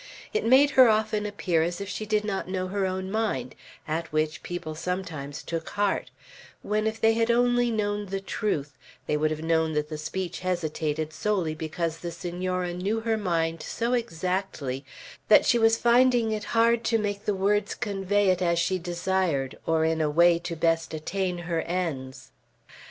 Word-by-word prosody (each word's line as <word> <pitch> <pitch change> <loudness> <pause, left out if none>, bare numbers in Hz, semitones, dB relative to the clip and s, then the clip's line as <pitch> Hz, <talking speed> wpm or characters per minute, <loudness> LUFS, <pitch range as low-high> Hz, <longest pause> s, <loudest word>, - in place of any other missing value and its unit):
It 435 - 0
made 270 +4 +5
her 260 -3 +7
often 215 -1 +1
appear 185 -5 0
as 175 +3 -1
if 200 - -5
she 215 +2 -5
did 210 0 +1
not 195 -3 -2
known 185 -1 -2
her 200 -1 0
own 190 0 -3
mind; 205 - -1 0.3
at 160 +1 -3
which 155 0 -1
people 175 -3 -5
sometimes 160 -4 -4
took 165 -1 -4
heart; 205 -1 0 0.5
when, 215 +1 0
if 220 0 -3
they 225 0 +4
had 230 +1 +1
only 245 0 +3
known 205 -2 -1
the 195 +1 -3
truth, 155 - -2 0.3
they 150 - 0
would 155 +1 +1
have 155 0 -4
known 160 -1 +1
that 150 0 -1
the 155 -1 -5
speech 175 +2 -4
hesitated 155 -4 -2
solely 185 -2 0
because 160 +1 -3
the 175 - -4
Senora 180 +1 -3
knew 200 +5 -1
her 225 0 +1
mind 165 -5 -1
so 235 +1 -2
exactly 180 - -2 0.4
that 215 - +7
she 240 - +4
was 225 0 +4
finding 240 -1 +4
it 215 0 -3
hard 230 0 +4
to 225 - +3
make 205 -1 -3
the 205 - +1
words 205 +2 +1
convey 200 -1 0
it 185 -1 +2
as 170 -1 +2
she 185 +2 +1
desired, 175 -5 -1
or 160 -1 +2
in 160 0 +1
a 155 - +2
way 170 +2 +5
to 170 0 -5
best 165 0 0
attain 180 +3 -2
her 170 -1 -2
ends. 135 -8 -4
185 Hz, 180 wpm, -26 LUFS, 160-210 Hz, 0.5 s, her